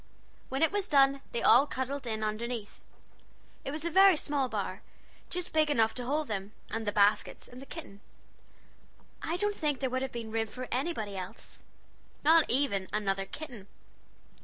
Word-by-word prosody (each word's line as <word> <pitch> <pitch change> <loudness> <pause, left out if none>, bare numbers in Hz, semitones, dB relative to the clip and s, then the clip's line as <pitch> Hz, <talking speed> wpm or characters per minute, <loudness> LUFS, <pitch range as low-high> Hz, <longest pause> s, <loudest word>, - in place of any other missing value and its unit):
When 270 +4 0
it 320 - +5
was 405 -1 -1
done 275 -1 +5
they 235 - -2
all 255 +6 +7
cuddled 260 0 -3
in 220 -1 -2
underneath. 215 0 -4 0.8
It - - -4
was 305 +3 -3
a 340 - 0
very 385 0 +7
small 285 -3 0
bower 200 -3 -3 0.5
just 360 0 -3
big 310 -1 +3
enough 225 -6 +3
to 245 - -5
hold 295 +3 0
them, 200 -1 -4 0.2
and 225 -1 -3
the - - +2
baskets, 205 0 +2
and 250 +1 -11
the 275 - -11
kitten. 205 - -9 1.2
I 335 +2 -2
don't 415 +1 +1
think 295 -7 0
there 260 -2 -1
would 260 0 0
have 265 -1 -3
been 230 -2 -6
room 225 0 0
for 250 +4 -7
anybody 250 -7 -2
else, 190 +3 -8 0.6
not 320 +1 +5
even 235 -8 +1
another 195 -2 -1
kitten. 240 -7 -9
255 Hz, 175 wpm, -30 LUFS, 215-295 Hz, 1.2 s, all